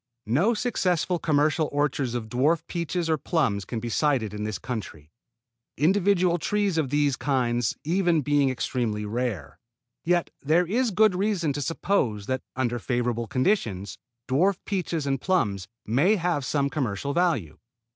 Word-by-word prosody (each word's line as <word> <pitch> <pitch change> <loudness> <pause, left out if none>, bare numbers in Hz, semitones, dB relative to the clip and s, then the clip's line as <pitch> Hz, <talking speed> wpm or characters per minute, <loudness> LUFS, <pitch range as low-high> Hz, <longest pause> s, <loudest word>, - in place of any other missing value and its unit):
No 165 - +2
successful 180 -7 0
commercial 155 0 +2
orchards 140 -4 0
of 115 -2 -3
dwarf 150 +8 +1
peaches 170 0 -2
or 160 -2 +1
plums 130 - 0
can 115 - -4
be 120 +1 -5
cited 125 -5 +1
in 105 0 -4
this 110 -1 -3
country, 105 - -7 0.7
individual 180 +2 +3
trees 200 -2 0
of 145 -5 0
these 145 -1 +2
kinds 120 -5 0
even 175 0 +2
being 145 -1 +2
extremely 120 -4 -2
rare; 105 - -3 0.4
yet 175 0 +1
there 160 +5 +3
is 235 +7 +1
good 215 0 +4
reason 180 -5 0
to 145 - -3
suppose 130 - 0
that 130 +2 -2
under 120 -2 -1
favorable 120 -1 -1
conditions 110 - -1 0.3
dwarf 175 +9 +2
peaches 175 -6 -2
and 135 -2 -1
plums 100 - 0 0.2
may 145 - +3
have 170 -6 -1
some 140 +1 0
commercial 140 0 -2
value. 155 - 0
145 Hz, 145 wpm, -26 LUFS, 120-175 Hz, 0.7 s, good